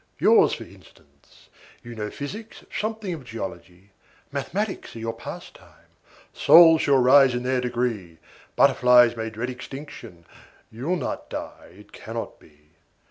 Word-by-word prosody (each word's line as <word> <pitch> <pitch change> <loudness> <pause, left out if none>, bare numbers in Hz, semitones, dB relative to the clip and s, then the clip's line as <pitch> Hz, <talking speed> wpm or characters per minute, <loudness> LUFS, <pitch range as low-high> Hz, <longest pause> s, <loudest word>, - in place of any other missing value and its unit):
"Yours, - - +4
for - - -6
instance: - - -21 0.4
you 120 - -9
know 105 -2 -5
physics, 210 - -9
something 215 -3 -3
of 155 -5 -8
geology, 95 -4 -9 0.4
Mathematics 185 - -4
are - - -7
your 115 0 -4
pastime; 115 - -12 0.5
souls 165 -2 +7
shall 140 -1 +3
rise 130 0 +5
in 120 - -3
their 130 0 0
degree; 120 -9 -3 0.4
Butterflies 125 -1 +5
may 115 -1 -4
dread 115 +3 -5
extinction, 125 - -11 0.5
you'll 135 +11 -3
not 155 - -5
die, - - -9
it - - -17
cannot - - -7
be! 75 0 -24
125 Hz, 135 wpm, -24 LUFS, 110-145 Hz, 0.5 s, souls